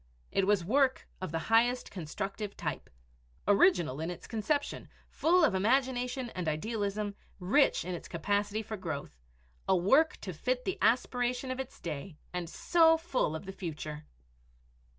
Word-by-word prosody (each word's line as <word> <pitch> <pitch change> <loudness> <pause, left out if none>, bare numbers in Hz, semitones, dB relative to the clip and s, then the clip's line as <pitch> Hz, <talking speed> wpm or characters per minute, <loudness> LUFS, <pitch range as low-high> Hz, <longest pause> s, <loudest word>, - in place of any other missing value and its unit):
It 195 -1 +1
was 200 -4 +3
work 265 +5 +2
of 185 - -4
the 165 - -1 0.2
highest 245 +2 +3
constructive 195 +4 -5
type - - -4 0.6
original 195 - +4
in 165 - -2
its 175 - -7
conception, 285 +6 -2 0.2
full 345 +2 +3
of 255 - +2
imagination 250 +3 +1
and 180 -3 -4
idealism, 205 +5 -2 0.3
rich 195 - +3
in 180 - -3
its 175 - -6
capacity 205 +5 -1
for 220 0 -5
growth 160 - -5 0.5
a 190 - +5
work 270 - +4
to 185 - -5
fit 250 +10 -1
the 380 - -2
aspiration 245 +3 +1
of 255 - -4
its 265 -1 -6
day 155 +1 -6 0.2
and 175 -2 -3
so 325 - +4
full 320 - -1
of 160 - -6
the 195 - -5
future! 155 -4 -6
205 Hz, 150 wpm, -31 LUFS, 180-255 Hz, 0.6 s, a